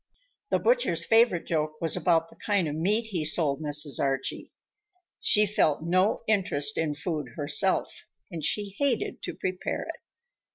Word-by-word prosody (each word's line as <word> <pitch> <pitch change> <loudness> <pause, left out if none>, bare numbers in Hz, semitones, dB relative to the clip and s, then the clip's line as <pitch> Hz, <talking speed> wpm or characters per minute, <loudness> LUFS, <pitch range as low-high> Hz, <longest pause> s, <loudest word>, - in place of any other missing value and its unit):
The - - +2
butcher's - - +1
favorite 225 -6 +3
joke 155 -1 -2
was 165 -2 +1
about 165 -2 +1
the - - -16
kind 200 -5 0
of 145 - -3
meat 205 +8 0
he 175 -5 -1
sold 150 -2 +1
Mrs. 150 -1 -2
Archie. 135 -1 -2 0.7
She 210 0 +4
felt 160 -7 +1
no 185 +5 +1
interest 145 -9 +2
in 155 -2 -1
food 145 -5 -4
herself, 165 +6 0 0.2
and 165 -3 -6
she 205 +4 -1
hated 275 -5 0
to - - -5
prepare 185 0 -3
it. - - -8
165 Hz, 155 wpm, -27 LUFS, 150-200 Hz, 0.7 s, She